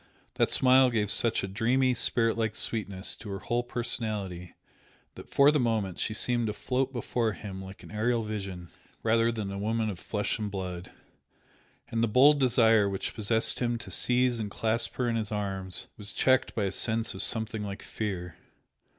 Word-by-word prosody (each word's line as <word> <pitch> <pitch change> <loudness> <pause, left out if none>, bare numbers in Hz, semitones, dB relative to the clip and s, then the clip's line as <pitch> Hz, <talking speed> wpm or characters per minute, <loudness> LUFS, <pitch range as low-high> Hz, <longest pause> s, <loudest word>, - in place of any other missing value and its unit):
That - - +2
smile 130 0 +5
gave 105 -4 0
such 115 -3 +1
a - - -2
dreamy, 125 +6 +2
spiritlike 115 -2 +1
sweetness 100 -4 -1
to 110 - -9
her 100 - -3
whole 120 +4 -1
personality 105 -7 -3 0.6
that - - -12
for 140 +1 +5
the 150 - +1
moment 110 -7 -1
she 110 - -1
seemed 120 +2 0
to 105 - -2
float 130 +5 -1
before 120 -2 -1
him 95 -2 -7
like 95 +1 -11
an - - -12
aerial 115 +2 0
vision 95 -5 -6 0.3
rather 115 +1 +3
than 110 -4 -4
a 100 - -5
woman 110 +1 0
of 90 - -8
flesh 105 +2 -2
and 105 -1 -2
blood, 90 -2 -5 1.0
and 115 0 0
the - - +3
bold 140 +6 +5
desire 115 -5 +4
which 95 -1 -3
possessed 110 +1 +2
him 120 -1 0
to 105 -4 -9
seize 125 +1 +2
and 105 -2 -3
clasp 110 +3 -1
her 125 - 0
in 115 - 0
his 110 -2 -3
arms 95 -3 -3
was 100 -2 -7
checked 130 -1 +2
by 110 - 0
a 95 - 0
sense 115 +2 0
of - - -3
something 110 -1 -1
like 100 -1 -6
fear. 90 -6 -5
110 Hz, 185 wpm, -28 LUFS, 100-120 Hz, 1.0 s, smile